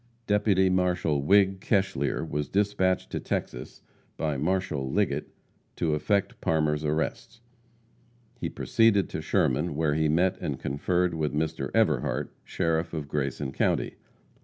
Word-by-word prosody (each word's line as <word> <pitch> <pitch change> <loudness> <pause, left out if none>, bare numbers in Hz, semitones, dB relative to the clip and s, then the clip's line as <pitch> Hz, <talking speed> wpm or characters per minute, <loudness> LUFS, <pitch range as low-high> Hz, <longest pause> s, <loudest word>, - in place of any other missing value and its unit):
Deputy 105 -3 +3
Marshal 90 -5 +1
Whig 95 +4 +4
Keshlear 95 - 0
was 75 -1 -3
dispatched 95 -2 +1
to - - -2
Texas 60 +2 -5 0.3
by 75 -2 -1
Marshal 75 -3 -1
Liggett 80 -6 0 0.5
to 80 -3 0
effect 100 +6 0
Parmer's 75 -1 +1
arrest. 80 +8 -2 1.0
He - - -2
proceeded 110 -4 +2
to - - -4
Sherman, 75 0 +1
where 75 -1 +1
he 80 0 +1
met 90 +4 +2
and 70 -3 -3
conferred 90 +6 0
with 75 -2 -2
Mr. 75 -3 -2
Everhart, - - +1
sheriff 80 0 -1
of 75 -2 -4
Grayson 70 -1 -2
county. - - 0
80 Hz, 130 wpm, -27 LUFS, 75-95 Hz, 1.0 s, Whig